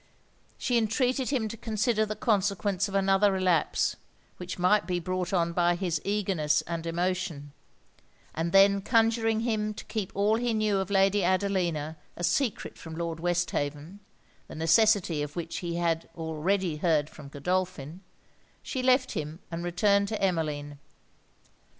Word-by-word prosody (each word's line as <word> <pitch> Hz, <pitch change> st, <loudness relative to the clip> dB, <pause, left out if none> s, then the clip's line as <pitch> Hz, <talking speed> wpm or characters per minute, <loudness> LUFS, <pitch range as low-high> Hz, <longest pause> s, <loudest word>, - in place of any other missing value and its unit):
She 245 Hz, -2 st, +1 dB
entreated 250 Hz, +4 st, 0 dB
him 250 Hz, -6 st, 0 dB
to 230 Hz, -, -6 dB
consider 220 Hz, 0 st, 0 dB
the 215 Hz, -, -3 dB
consequence 200 Hz, -3 st, 0 dB
of 195 Hz, -, -6 dB
another 195 Hz, +1 st, +3 dB
relapse, 185 Hz, -4 st, +1 dB, 0.4 s
which 180 Hz, -1 st, -6 dB
might 200 Hz, +4 st, +3 dB
be 180 Hz, -1 st, 0 dB
brought 185 Hz, +1 st, -3 dB
on 170 Hz, -3 st, +1 dB
by 175 Hz, 0 st, +2 dB
his 170 Hz, -3 st, -2 dB
eagerness 195 Hz, -7 st, 0 dB
and 165 Hz, 0 st, -5 dB
emotion; 175 Hz, -4 st, -2 dB, 0.8 s
and 165 Hz, +1 st, -2 dB
then 195 Hz, +1 st, +5 dB
conjuring 225 Hz, 0 st, +2 dB
him 215 Hz, -2 st, -1 dB
to -, -, -9 dB
keep 210 Hz, -4 st, -4 dB
all 205 Hz, +3 st, +2 dB
he 235 Hz, -1 st, 0 dB
knew 215 Hz, -2 st, +1 dB
of 190 Hz, 0 st, -3 dB
Lady 195 Hz, 0 st, +3 dB
Adelina 175 Hz, -5 st, 0 dB, 0.2 s
a 175 Hz, -, -5 dB
secret 245 Hz, +4 st, -1 dB
from 160 Hz, -1 st, -8 dB
Lord 165 Hz, -1 st, -3 dB
Westhaven 170 Hz, -1 st, -2 dB, 0.5 s
(the -, -, -10 dB
necessity 175 Hz, 0 st, +3 dB
of 145 Hz, 0 st, -5 dB
which 170 Hz, -1 st, -4 dB
he 170 Hz, -1 st, -3 dB
already 165 Hz, +1 st, -1 dB
had -, -, -14 dB
heard 155 Hz, -4 st, +2 dB
from 145 Hz, -, -11 dB
Godolphin) 175 Hz, +1 st, -3 dB, 0.6 s
she 260 Hz, -, -3 dB
left 255 Hz, 0 st, +3 dB
him 155 Hz, +1 st, -4 dB
and 170 Hz, +1 st, -4 dB
returned 200 Hz, +3 st, +2 dB
to 215 Hz, +1 st, -3 dB
Emmeline. 150 Hz, -6 st, -2 dB
185 Hz, 150 wpm, -28 LUFS, 165-210 Hz, 0.8 s, then